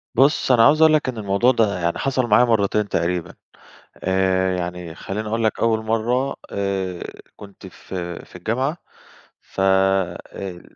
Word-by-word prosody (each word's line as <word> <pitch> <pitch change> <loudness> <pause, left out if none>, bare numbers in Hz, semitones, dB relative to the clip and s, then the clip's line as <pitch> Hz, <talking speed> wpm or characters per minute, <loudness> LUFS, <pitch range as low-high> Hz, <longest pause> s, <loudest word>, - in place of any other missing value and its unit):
بُص، 135 +2 +3
أنا 120 -2 +6
عاوز 155 +2 +4
أقول 160 -1 +6
لك 150 -4 +2
إن 125 - -6
الموضوع 100 +4 +2
ده 105 -6 +1
يعني 85 -1 -1
حصل 130 -2 0
معايا 115 +3 +5
مرّتين 105 -2 +1
تقريبًا. 85 0 -1 0.6
آآ 95 0 +1
يعني 90 -2 -5
خَلّيني 105 +5 -5
أقول 115 +1 -1
لك 110 - 0
أول 110 -1 +1
مرّة، 120 +5 0
آآ 95 -3 -3 0.3
كنت 100 -1 -13
ف 95 - -12 0.3
في - - -14
الجامعة، 130 - -2 0.6
ف - - -8
آآ 95 -1 0
100 Hz, 150 wpm, -21 LUFS, 95-120 Hz, 0.6 s, أنا